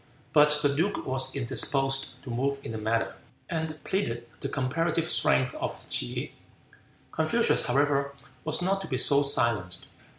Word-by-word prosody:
But 150 Hz, -1 st, +5 dB
the 145 Hz, -1 st, +2 dB
duke 195 Hz, +7 st, -1 dB
was 130 Hz, +1 st, 0 dB
indisposed 135 Hz, +1 st, +1 dB, 0.2 s
to 130 Hz, -, -7 dB
move 140 Hz, +4 st, -1 dB
in -, -, -6 dB
the 110 Hz, -, -5 dB
matter, 115 Hz, +2 st, -1 dB, 0.3 s
and 160 Hz, -2 st, -3 dB
pleaded 120 Hz, -, -2 dB
the 140 Hz, -, -4 dB
comparative 160 Hz, +5 st, -1 dB
strength 125 Hz, +1 st, +2 dB
of -, -, -6 dB
T'se. -, -, -2 dB, 0.8 s
Confucius, -, -, +3 dB
however, 140 Hz, +1 st, +1 dB, 0.3 s
was 155 Hz, +3 st, 0 dB
not 195 Hz, +2 st, 0 dB
to -, -, -7 dB
be 130 Hz, -, -2 dB
so 140 Hz, +2 st, +5 dB
silenced. 110 Hz, -10 st, +1 dB
140 Hz, 145 wpm, -27 LUFS, 125-155 Hz, 0.8 s, But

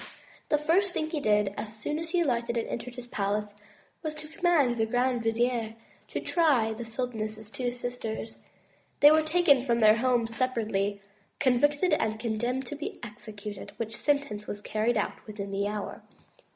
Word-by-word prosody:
The 300 Hz, -, +4 dB
first 350 Hz, +6 st, +2 dB
thing 310 Hz, 0 st, -1 dB
he 310 Hz, -, -1 dB
did 210 Hz, -5 st, +2 dB
as 210 Hz, +1 st, -4 dB
soon 295 Hz, +8 st, -2 dB
as 330 Hz, 0 st, -4 dB
he 350 Hz, +1 st, +2 dB
alighted 235 Hz, -5 st, 0 dB
and 230 Hz, -, -1 dB
entered 240 Hz, +1 st, -5 dB
his 250 Hz, -2 st, -7 dB
palace, 210 Hz, -1 st, -1 dB, 0.5 s
was 310 Hz, -2 st, -3 dB
to 305 Hz, 0 st, -8 dB
command 310 Hz, -7 st, +2 dB
the 220 Hz, -1 st, +1 dB
grand 245 Hz, +1 st, +1 dB
vizier 225 Hz, 0 st, 0 dB, 0.3 s
to -, -, -3 dB
try 275 Hz, -10 st, +2 dB
the 230 Hz, +2 st, -6 dB
sultaness's 220 Hz, -2 st, -4 dB
two 250 Hz, -2 st, -2 dB
sisters. 245 Hz, -2 st, -4 dB, 0.6 s
They 290 Hz, -, +10 dB
were 315 Hz, 0 st, +6 dB
taken 310 Hz, -4 st, +4 dB
from 240 Hz, -3 st, +2 dB
their 215 Hz, -1 st, +6 dB
homes 235 Hz, -2 st, +1 dB
separately, 210 Hz, -6 st, 0 dB, 0.4 s
convicted, 290 Hz, +6 st, +3 dB
and 220 Hz, -6 st, +1 dB
condemned 240 Hz, +3 st, -1 dB
to 295 Hz, -, -6 dB
be 295 Hz, +2 st, -5 dB
executed; 210 Hz, -2 st, -8 dB
which 220 Hz, -1 st, -4 dB
sentence 280 Hz, -8 st, 0 dB
was 205 Hz, -, -4 dB
carried 220 Hz, +3 st, 0 dB
out 210 Hz, -, -2 dB
within 200 Hz, -2 st, -6 dB
the 200 Hz, +1 st, 0 dB
hour. 210 Hz, -1 st, -4 dB
240 Hz, 170 wpm, -29 LUFS, 215-285 Hz, 0.6 s, They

